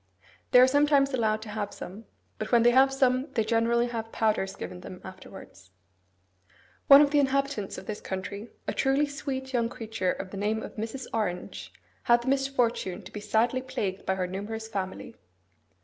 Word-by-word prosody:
They 250 - +7
are 250 - +9
sometimes 285 0 +3
allowed 220 -3 +1
to 220 - -9
have 205 -1 -4
some; 205 +5 -9 0.3
but 215 - -4
when 235 -2 +5
they 240 - +6
have 265 +2 +5
some, 265 +1 +1
they 225 - +1
generally 230 +2 +2
have 225 -2 -5
powders 210 -3 0
given 180 - -7
them 180 - -9
afterwards. 185 - -12 1.2
One 280 +1 +10
of 285 - +1
the 295 - +4
inhabitants 275 -6 0
of - - -8
this 210 +1 -5
country, 200 +4 -5 0.2
a - - -1
truly 270 +2 +2
sweet 270 -2 -5
young 235 -2 +1
creature 220 -6 -2
of 185 - -6
the 200 - -6
name 215 +2 -1
of - - -9
Mrs. 225 +4 -5
Orange, 195 -6 -3 0.3
had 240 0 +4
the 260 - -2
misfortune 245 -8 0
to - - -11
be 210 - -5
sadly 225 +5 +1
plagued 200 -7 -4
by 190 - +2
her 185 -1 -1
numerous 205 +4 -5
family. 190 -4 -5
225 Hz, 180 wpm, -28 LUFS, 205-260 Hz, 1.2 s, One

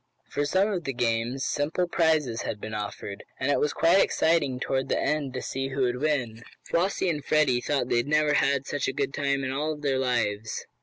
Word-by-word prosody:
For 145 - 0
some 190 +7 +2
of 180 -5 -3
the 135 - -2
games 120 +2 -1
simple 155 +5 0
prizes 155 -9 +1
had 105 - -4
been 110 - -6
offered 105 -1 -5 0.2
and 135 +2 +1
it - - +2
was 150 - +1
quite 175 +4 +4
exciting 150 -6 +1
toward 130 0 -1
the - - +1
end 150 -3 0
to 130 - -3
see 135 0 -3
who 135 0 -2
would 125 0 0
win. 125 -7 -1 0.2
Flossie 185 +2 0
and 150 -4 -1
Freddie 135 -5 +2
thought 135 -3 0
they - - +2
had 120 - 0
never 150 0 +3
had 140 -2 +2
such 145 -2 -2
a - - -1
good - - -2
time 140 -1 0
in 130 - -2
all 150 +3 -2
their 140 -3 0
lives. 110 -4 -1
140 Hz, 215 wpm, -27 LUFS, 125-150 Hz, 0.2 s, quite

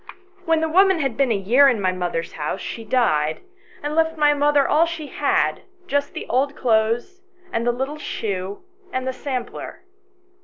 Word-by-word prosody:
When 325 -1 +2
the 320 - +1
woman 380 +3 +4
had 270 -7 -1
been 270 -2 +2
a - - +2
year 240 +9 +5
in 240 -5 0
my 185 -2 +1
mother's 175 -2 -3
house 150 -1 -3
she 230 - -6
died, 155 -10 +1 0.4
and 295 +1 -2
left 325 0 +1
my 295 -1 +4
mother 290 -1 +3
all 320 +3 +4
she 335 -2 -5
had, - - 0 0.2
just 285 -5 -1
the - - -5
old 275 +4 +1
clothes, 240 - 0 0.3
and 230 +1 -1
the - - +4
little 270 +5 -4
shoe, 200 - -4 0.3
and 260 0 -3
the 260 - -1
sampler. 255 +3 -5
260 Hz, 180 wpm, -22 LUFS, 220-300 Hz, 0.4 s, year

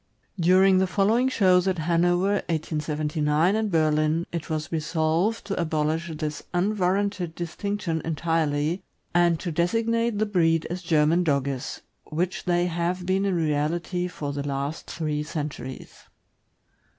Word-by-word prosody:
During 185 +2 +5
the 190 - +2
following 220 +7 +2
shows 185 -6 +3
at 185 -1 +1
Hanover 175 +4 +2
(1879) 155 +1 0
and 220 -1 0
Berlin, 155 0 +2
it 170 -2 -5
was 155 -1 -3
resolved 165 +7 0
to 200 -3 -2
abolish 160 +1 -1
this 150 0 -4
unwarranted 190 -2 0
distinction 175 0 -3
entirely, 160 0 0 0.3
and 175 -2 +3
to 175 - -3
designate 230 +7 +1
the 215 - +2
breed 165 -5 +2
as 180 +1 -3
German 165 0 +3
Dogges, 140 -4 -1 0.2
which 175 +4 -2
they 175 -1 +2
have 175 +1 -2
been 190 +2 +1
in 195 -2 +1
reality 165 +3 0
for 145 -5 -5
the 140 - -3
last 140 +3 -3
three 150 -2 -2
centuries. 150 -3 -5
170 Hz, 130 wpm, -25 LUFS, 155-185 Hz, 0.3 s, During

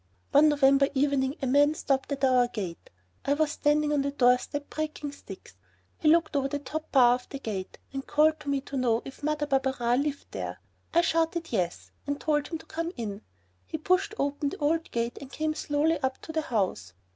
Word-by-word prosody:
One 300 +2 +6
November 275 -1 +4
evening 270 0 +1
a - - +2
man 290 +4 +4
stopped 270 -2 -1
at 275 -1 -3
our 255 -2 +4
gate. 190 -8 -6 0.3
I 285 - +2
was 305 0 +1
standing 300 0 +2
on 290 - +2
the 280 - -1
doorstep 270 +2 +2
breaking 305 -2 -4
sticks. 285 - -12 0.5
He 315 - 0
looked 325 -1 +3
over 275 -1 +2
the 290 +1 -2
top 310 +2 -6
bar 245 -3 +6
of 250 0 -4
the 275 - -5
gate 205 -8 -5 0.2
and 270 0 -5
called 310 +1 +3
to 290 - -6
me 280 -1 +1
to 280 - -8
know 235 -3 +1
if 270 - -10
Mother 300 0 0
Barberin 265 -3 +1
lived 285 -1 -4
there. - - -5 0.3
I 340 - +4
shouted 330 0 0
yes 180 -6 -2 0.2
and 285 0 -2
told 295 -2 0
him 330 - -4
to - - -15
come 330 +1 -3
in. 210 -3 -4 0.5
He - - -3
pushed 365 +7 +1
open 285 +1 -1
the - - -7
old 320 +2 0
gate 235 0 -2
and 275 -1 -10
came 310 0 -1
slowly 305 +2 0
up 265 -2 -2
to - - -6
the 320 0 0
house. 185 - -1
285 Hz, 205 wpm, -28 LUFS, 260-305 Hz, 0.5 s, One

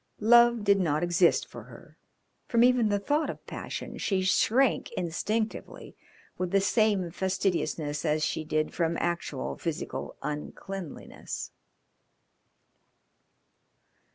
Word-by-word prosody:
Love 235 0 +6
did 200 -1 +4
not 155 -3 +1
exist 175 0 +3
for - - -10
her; - - -15 0.5
from 235 -1 +3
even 245 -3 +4
the 205 - +2
thought 290 +10 0
of - - -7
passion - - -6
she 190 -2 0
shrank 235 +7 +2
instinctively 215 +4 -3 0.4
with 180 -1 -1
the 195 - +3
same 200 -3 +2
fastidiousness 170 -5 -1
as 155 -1 +1
she 160 - -2
did 155 0 -1
from 165 -1 0
actual 170 -6 -2
physical 165 -3 -4
uncleanliness. 165 +3 -6
190 Hz, 110 wpm, -28 LUFS, 165-215 Hz, 0.5 s, Love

